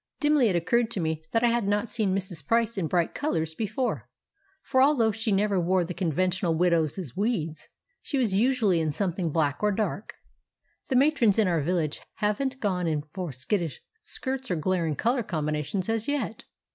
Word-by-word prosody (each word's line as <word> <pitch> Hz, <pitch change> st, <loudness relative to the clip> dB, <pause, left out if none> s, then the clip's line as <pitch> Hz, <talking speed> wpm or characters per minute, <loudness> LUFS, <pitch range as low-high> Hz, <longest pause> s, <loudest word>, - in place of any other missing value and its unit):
Dimly 295 Hz, -4 st, +4 dB
it 185 Hz, -, 0 dB
occurred 220 Hz, +8 st, +2 dB
to 220 Hz, -, -4 dB
me 160 Hz, -2 st, -1 dB
that 225 Hz, +1 st, +1 dB
I 240 Hz, -, +5 dB
had 235 Hz, -3 st, +1 dB
not 205 Hz, +3 st, +1 dB
seen 210 Hz, -3 st, 0 dB
Mrs. 185 Hz, -5 st, -4 dB
Price 230 Hz, 0 st, +2 dB
in 185 Hz, -5 st, -1 dB
bright 170 Hz, 0 st, +1 dB
colours 160 Hz, -, -1 dB
before, 225 Hz, +7 st, -2 dB, 0.5 s
for 260 Hz, -, +2 dB
although 265 Hz, -6 st, +4 dB
she 220 Hz, +1 st, -2 dB
never 200 Hz, -1 st, +2 dB
wore 180 Hz, +1 st, +2 dB
the 175 Hz, +1 st, -5 dB
conventional 180 Hz, 0 st, 0 dB
widow's 165 Hz, -4 st, 0 dB
weeds, 190 Hz, -7 st, -2 dB, 0.3 s
she 285 Hz, -, -3 dB
was 235 Hz, -7 st, +1 dB
usually 215 Hz, -4 st, +3 dB
in 155 Hz, -1 st, 0 dB
something 180 Hz, 0 st, -1 dB
black 145 Hz, -3 st, 0 dB
or 210 Hz, -, +3 dB
dark; 205 Hz, 0 st, -3 dB, 0.7 s
the 265 Hz, -, +1 dB
matrons 255 Hz, -6 st, +4 dB
in 220 Hz, -3 st, +4 dB
our 170 Hz, -3 st, +1 dB
village 160 Hz, -1 st, -1 dB
haven't 255 Hz, +6 st, -1 dB
gone 185 Hz, -6 st, 0 dB
in 150 Hz, -2 st, 0 dB
for 180 Hz, -5 st, -4 dB
skittish 145 Hz, -, -2 dB, 0.2 s
skirts 265 Hz, -1 st, -5 dB
or -, -, +1 dB
glaring 165 Hz, -1 st, 0 dB
colour 240 Hz, -, +1 dB
combinations 155 Hz, -1 st, -2 dB
as 225 Hz, -1 st, -1 dB
yet! 280 Hz, -6 st, -2 dB
195 Hz, 180 wpm, -27 LUFS, 165-230 Hz, 0.7 s, I